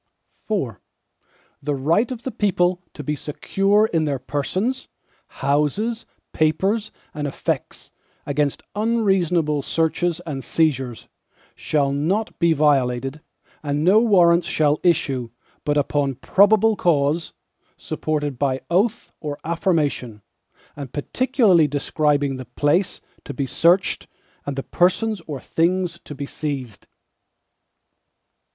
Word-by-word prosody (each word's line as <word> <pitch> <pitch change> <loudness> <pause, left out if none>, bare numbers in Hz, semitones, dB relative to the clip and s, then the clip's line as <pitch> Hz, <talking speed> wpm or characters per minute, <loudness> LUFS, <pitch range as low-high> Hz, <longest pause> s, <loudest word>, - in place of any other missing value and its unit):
IV 135 - -1 0.8
The 145 0 -1
right 165 - +1
of 240 -2 -6
the 260 - -3
people 180 -4 +1
to 150 - -7
be 150 +2 -1
secure 195 +8 +1
in 160 -2 +2
their 145 -2 -1
persons, 185 - -2 0.4
houses, 150 - -1 0.3
papers, 195 +8 +1 0.2
and 150 -3 -3
effects, 140 - -4 0.3
against 145 0 -1
unreasonable 190 -9 +1
searches 165 +3 0
and 140 -5 -5
seizures, 135 -7 0 0.5
shall 140 -3 0
not 180 +10 -1
be 170 0 +4
violated, 135 -2 +1 0.4
and 145 0 -1
no 195 +6 +6
Warrants 175 -6 +4
shall 150 -1 +2
issue, 135 -8 +1 0.3
but 145 0 +1
upon 140 -1 0
probable 215 - +4
cause, 160 -2 +1 0.4
supported 150 -4 -3
by 135 -2 0
oath 210 +6 +1
or 145 -2 -5
affirmation, 150 - -1 0.5
and 140 -4 -7
particularly 200 - +2
describing 145 -1 0
the 130 - -7
place 150 - 0 0.2
to - - -7
be 140 - -1
searched, 170 +8 +2 0.4
and 140 - -2
the 135 - -3
persons 190 +3 +1
or 145 -4 -4
things 170 +3 0
to 145 - -8
be 140 +1 -5
seized. 140 -7 -5
155 Hz, 115 wpm, -22 LUFS, 140-185 Hz, 0.8 s, no